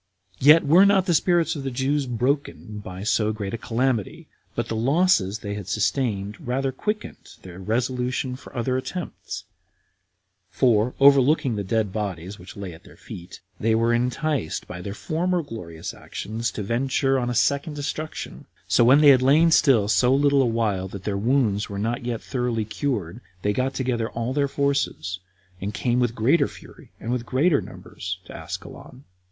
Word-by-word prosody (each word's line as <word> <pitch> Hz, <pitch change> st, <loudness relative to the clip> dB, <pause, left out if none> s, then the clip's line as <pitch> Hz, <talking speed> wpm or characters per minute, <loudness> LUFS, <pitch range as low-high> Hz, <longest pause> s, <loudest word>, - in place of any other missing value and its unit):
3. 135 Hz, -, 0 dB
Yet 155 Hz, +1 st, +8 dB
were 170 Hz, +7 st, +7 dB
not 200 Hz, -2 st, +4 dB
the 175 Hz, -, +2 dB
spirits 170 Hz, +1 st, +2 dB
of 145 Hz, -, -4 dB
the 135 Hz, -, -3 dB
Jews 135 Hz, +2 st, 0 dB
broken 125 Hz, -3 st, -2 dB
by 95 Hz, -1 st, -8 dB
so 110 Hz, 0 st, +1 dB
great 105 Hz, -2 st, -5 dB
a -, -, -1 dB
calamity, 130 Hz, -, -1 dB, 0.3 s
but 120 Hz, -1 st, -2 dB
the 115 Hz, -, -3 dB
losses 120 Hz, -, +2 dB
they 105 Hz, -3 st, -5 dB
had 100 Hz, -3 st, -6 dB
sustained 105 Hz, -2 st, -1 dB
rather 135 Hz, +2 st, 0 dB
quickened 210 Hz, -, -5 dB
their 90 Hz, 0 st, -10 dB
resolution 125 Hz, +4 st, -1 dB
for 135 Hz, -, -13 dB
other 125 Hz, +2 st, 0 dB
attempts; 175 Hz, +7 st, -6 dB, 1.1 s
for, 120 Hz, -1 st, +2 dB
overlooking 140 Hz, -1 st, +5 dB
the 100 Hz, -, -2 dB
dead 105 Hz, 0 st, -1 dB
bodies 100 Hz, -2 st, -4 dB
which 90 Hz, +3 st, -12 dB
lay 95 Hz, -3 st, -6 dB
under 80 Hz, -, -15 dB
their -, -, -16 dB
feet, 90 Hz, +1 st, -10 dB, 0.2 s
they 110 Hz, +1 st, +2 dB
were 115 Hz, +1 st, +2 dB
enticed 125 Hz, -, -1 dB
by 90 Hz, -, -7 dB
their 100 Hz, +2 st, -6 dB
former 165 Hz, -, -1 dB
glorious 85 Hz, -, -7 dB
actions 115 Hz, +2 st, -4 dB
to 105 Hz, -, -5 dB
venture 135 Hz, +4 st, +1 dB
on 120 Hz, -1 st, -1 dB
a 120 Hz, -, -2 dB
second 140 Hz, +5 st, +1 dB
destruction; 150 Hz, +2 st, -5 dB, 0.2 s
so -, -, +4 dB
when 130 Hz, +5 st, +6 dB
they 150 Hz, -, +8 dB
had 130 Hz, -2 st, +7 dB
lain 155 Hz, +6 st, +5 dB
still 130 Hz, -10 st, +4 dB
so 110 Hz, +5 st, +3 dB
little 140 Hz, 0 st, +4 dB
a 130 Hz, -, +2 dB
while 110 Hz, -5 st, 0 dB
that 95 Hz, 0 st, -9 dB
their 100 Hz, -1 st, -2 dB
wounds 110 Hz, -1 st, +1 dB
were 100 Hz, -, -5 dB
not 115 Hz, +4 st, -2 dB
yet 120 Hz, -2 st, -3 dB
thoroughly 120 Hz, -4 st, -1 dB
cured, 110 Hz, -, -3 dB, 0.2 s
they 105 Hz, -, +1 dB
got 130 Hz, +4 st, -1 dB
together 120 Hz, -4 st, -1 dB
all 120 Hz, +2 st, -3 dB
their 140 Hz, 0 st, +1 dB
forces, 140 Hz, -10 st, -1 dB, 0.4 s
and 100 Hz, +2 st, -4 dB
came 125 Hz, -1 st, +1 dB
with 120 Hz, -2 st, 0 dB
greater 125 Hz, +10 st, +3 dB
fury, -, -, -14 dB
and 115 Hz, -, -6 dB
in -, -, +1 dB
much 125 Hz, -2 st, -2 dB
greater 140 Hz, +6 st, +2 dB
numbers, 95 Hz, -1 st, -7 dB
to -, -, -11 dB
Ascalon. 130 Hz, +2 st, -9 dB
120 Hz, 180 wpm, -24 LUFS, 105-140 Hz, 1.1 s, Yet